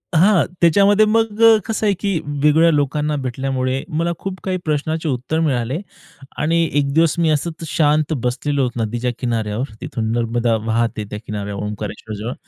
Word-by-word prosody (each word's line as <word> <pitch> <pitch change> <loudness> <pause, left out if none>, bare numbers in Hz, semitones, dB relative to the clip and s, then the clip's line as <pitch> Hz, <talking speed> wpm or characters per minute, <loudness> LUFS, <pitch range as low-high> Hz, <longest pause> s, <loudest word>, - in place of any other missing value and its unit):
हां. 185 +2 +5 0.2
त्याच्यामध्ये 200 +5 +5
मग 225 0 +1 0.3
कसं 220 -1 -1
आहे, 205 - +3
की 195 -5 0
वेगवेगळ्या 150 +3 +3
लोकांना 150 +1 0
भेटल्यामुळे, 130 +1 -2
मला 170 +1 +1
खूप 190 -1 -5
काही 185 -1 -1
प्रश्नाचे 155 +1 -1
उत्तर 130 +5 -1
मिळाले 135 -2 0 0.6
आणि 165 +2 +2
एक 140 -1 +1
दिवस 165 -1 +3
मी 165 - +3
असंच 160 +2 -2
शांत 155 0 +2
बसलेलो 135 +3 0
होतो 120 -2 -2
नदीच्या 120 +3 -2
किनाऱ्यावर. 115 0 -2
तिथून 110 -1 -3
नर्मदा 115 0 +1
वाहते 115 -1 0
त्या 105 - -4
किनाऱ्यावर 105 -1 -4
ओंकारेश्वरजवळ. 105 +2 -5
145 Hz, 150 wpm, -19 LUFS, 120-165 Hz, 0.6 s, हां